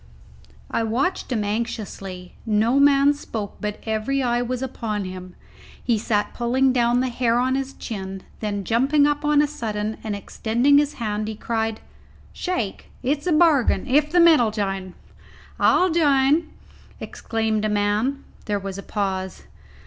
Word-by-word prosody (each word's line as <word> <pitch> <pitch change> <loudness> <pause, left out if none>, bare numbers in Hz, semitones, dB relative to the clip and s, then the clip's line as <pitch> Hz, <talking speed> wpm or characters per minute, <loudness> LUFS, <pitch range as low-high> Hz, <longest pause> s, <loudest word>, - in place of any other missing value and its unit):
I - - 0
watched 250 +10 -1
him 220 -4 0
anxiously. 205 -4 -4
No 225 +4 +2
man 280 0 +5
spoke, 220 -8 -6
but 210 0 -3
every 225 +5 -1
eye 240 -1 +1
was 250 +1 -3
upon 220 -6 -3
him. 185 -1 -8 0.5
He 230 -3 +1
sat 210 -1 -1
pulling 255 +2 +2
down 240 0 +2
the 260 - 0
hair 235 -1 +1
on 255 +1 +1
his 270 0 -3
chin, 190 -4 -6 0.2
then, 205 -2 -3
jumping 270 +8 +3
up 295 0 0
on 295 0 +4
a - - +1
sudden 215 -6 -4
and 215 -2 -3
extending 240 +7 +2
his 295 0 -1
hand, 215 -2 -3
he 220 - -4
cried, 225 0 -2 0.5
"Shake! 245 - -3
it's 290 +5 -1
a - - +2
bargain, 305 -5 +3
if 295 +3 +3
the 350 - +4
men 335 -5 +7
'll 230 - +2
jine." 195 -3 -3 0.6
"I'll 365 -1 +4
jine!" 300 0 +3 0.5
exclaimed 220 -1 -2
a 215 - +1
man. 210 +6 0 0.2
There 210 -2 0
was 195 -1 -6
a - - -5
pause. 190 -2 -3
230 Hz, 155 wpm, -23 LUFS, 210-275 Hz, 0.6 s, men